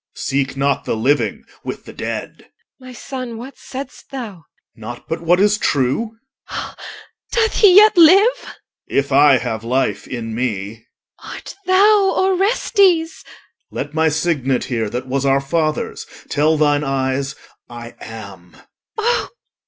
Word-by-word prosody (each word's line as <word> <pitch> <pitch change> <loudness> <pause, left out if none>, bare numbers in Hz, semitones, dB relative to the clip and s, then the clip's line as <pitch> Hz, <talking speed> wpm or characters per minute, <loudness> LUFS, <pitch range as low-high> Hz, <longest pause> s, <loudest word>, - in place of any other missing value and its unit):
Seek 135 0 -2
not 140 +1 0
the - - -1
living 135 +6 0 0.2
with - - -6
the - - -11
dead, - - -5
EL. 255 - -21
My - - -9
son, 250 -1 -7
what 255 +4 -9
saidst 270 +1 -9
thou? 255 -5 -5
OR. 165 - -22 0.3
Nought 115 +2 -9
but 165 - -3
what 175 +2 +3
is 210 +2 +3
true. 145 - 0 0.3
EL. - - -6 0.6
Doth 450 -2 +1
he 390 -4 +6
yet 425 +1 +8
live? 380 +8 +6
OR. - - -10 0.4
If 140 +1 -1
I 140 0 +6
have 115 -3 -4
life 115 -4 -1
in 115 -2 -5
me. 110 -2 -4 0.4
EL. - - -9
Art - - -9
thou 395 +1 +4
Orestes? 380 -3 +2 0.5
OR. - - -10
Let 145 - -4
my 160 0 +2
signet 145 -5 0
here, 115 -4 -2
That 125 +4 -4
was 135 +1 -2
our 135 0 +3
father's, 155 +2 -2 0.2
tell 155 +2 +2
thine 145 -1 +2
eyes, 135 +1 -1 0.3
I 120 0 -9
am. 100 -6 -11
145 Hz, 150 wpm, -19 LUFS, -, 0.6 s, yet